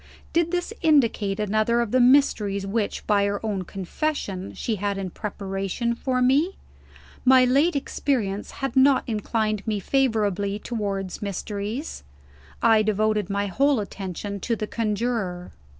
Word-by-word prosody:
Did 340 0 +2
this 355 +4 -2
indicate 230 -10 +2
another 215 +3 +1
of 235 -3 -1
the 255 - +3
mysteries 235 -7 +3
which, 205 +1 -2
by 205 -1 +3
her 200 0 -1
own 195 -4 -2
confession, 195 - -3
she 220 -3 -2
had 200 0 -2
in 190 -2 -4
preparation 195 +4 -3
for 255 +1 0
me? 290 +9 +3 0.7
My 255 0 +6
late 280 +7 +3
experience 230 -8 -1 0.2
had 265 - -4
not 265 0 +5
inclined 215 -1 -1
me 210 -2 0
favorably 205 -5 0
towards 200 -4 -4
mysteries. 205 - -4 0.6
I 225 -2 +6
devoted 215 -1 +1
my 200 0 0
whole 275 +7 +2
attention 200 0 -5
to 230 +5 -1
the 215 - -3
Conjurer. 210 -5 -2
215 Hz, 135 wpm, -24 LUFS, 200-255 Hz, 0.7 s, My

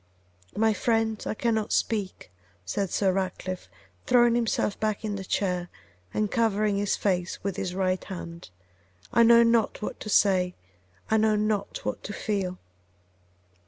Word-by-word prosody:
'My 220 0 +3
friend, 225 0 0
I - - -2
cannot 220 -2 0
speak,' 200 - -1 0.3
said 195 - -2
Sir 195 +1 +2
Ratcliffe, 185 -1 -3 0.4
throwing 240 -1 +5
himself 230 -3 0
back 215 0 -1
in 210 -1 -2
the 195 - -5
chair 180 -2 -1 0.4
and 210 -1 -1
covering 215 -3 +1
his 205 0 +1
face 185 -2 -1
with 200 -1 -2
his 190 -2 -3
right 185 -1 0
hand; 170 - -8 0.6
'I 235 - +5
know 235 0 +7
not 230 -2 +2
what - - -4
to 215 - -7
say; 185 -3 +3 0.6
I 220 - +5
know 215 0 +3
not 210 -1 -1
what - - -3
to 205 - -5
feel. 195 -4 -2
205 Hz, 150 wpm, -27 LUFS, 185-220 Hz, 0.6 s, know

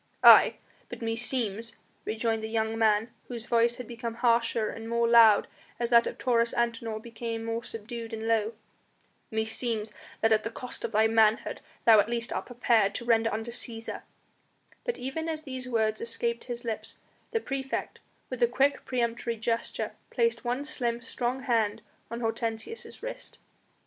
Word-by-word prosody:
"Aye! - - +9 0.3
but - - -8
meseems," 230 -1 -1 0.3
rejoined 225 0 -1
the 220 - -3
young 220 0 -1
man, 220 0 +2 0.2
whose 235 -2 -6
voice 235 0 +3
had 250 -2 -8
become 235 -1 -5
harsher 230 -2 +2
and 225 0 -8
more 235 0 +2
loud 230 -3 +7 0.3
as 235 0 -1
that 235 0 +6
of - - -5
Taurus 235 -2 +1
Antinor 230 -2 -1
became 230 0 -5
more 230 +1 -2
subdued 230 +1 -6
and 225 0 -4
low, 225 0 +2 0.8
"meseems 220 0 -2 0.3
that 225 - +3
at 215 -1 +4
the - - -2
cost 245 +2 -7
of - - -2
thy 220 0 +4
manhood 220 0 +3 0.2
thou 225 -2 +8
at 205 - +2
least 235 +1 -2
art - - -3
prepared 235 -4 +2
to 240 - -4
render 225 -1 +3
unto 225 +2 -3
Cæsar 230 -1 -6 0.4
" - - -34
But 485 - -1
even 295 +6 -3
as 315 -1 -3
these 260 -4 -6
words 220 -2 +1
escaped 235 0 -1
his 240 -1 -6
lips 225 -2 -4 0.3
the 455 - 0
praefect, 270 -8 -4 0.3
with 255 -1 -5
a 240 - +6
quick 270 +4 +1
peremptory 235 -2 -1
gesture, 230 +1 -2 0.2
placed 465 - +1
one 250 +4 -1
slim, 240 -5 -2
strong 255 +1 -2
hand 225 -3 +1 0.3
on 235 +1 -5
Hortensius' 225 - -3
wrist. - - -6
230 Hz, 165 wpm, -28 LUFS, 225-240 Hz, 0.8 s, Aye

